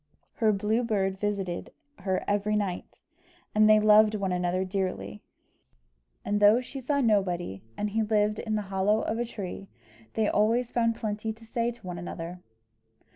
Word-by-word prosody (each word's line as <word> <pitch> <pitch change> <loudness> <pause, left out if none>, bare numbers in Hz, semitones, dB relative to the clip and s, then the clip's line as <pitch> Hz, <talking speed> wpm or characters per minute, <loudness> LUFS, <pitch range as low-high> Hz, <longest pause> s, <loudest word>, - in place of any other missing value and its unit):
Her 220 -2 +3
Blue 210 +4 0
Bird 195 -4 0
visited 195 -4 -3 0.3
her 190 -1 -1
every 205 +1 +1
night, 195 -4 -1 0.7
and 215 0 +5
they 215 0 +7
loved 215 0 +6
one 195 -3 -1
another 180 +1 0
dearly. 190 +2 -3 1.0
And 205 0 0
though 205 +3 +6
she 255 +2 -7
saw 280 +3 0
nobody 180 - 0 0.2
and 210 0 -2
he 225 +2 +1
lived 210 -1 +1
in 215 -1 -2
the 210 - -1
hollow 205 +3 +2
of 225 - -2
a 240 - 0
tree, 195 -3 -7 0.5
they 220 -1 +2
always 230 +4 +2
found 230 -1 +1
plenty 220 0 -3
to 225 +1 -17
say 230 +1 -1
to 240 -4 -10
one 175 -1 -5
another. 175 0 -6
210 Hz, 165 wpm, -28 LUFS, 190-220 Hz, 1.0 s, they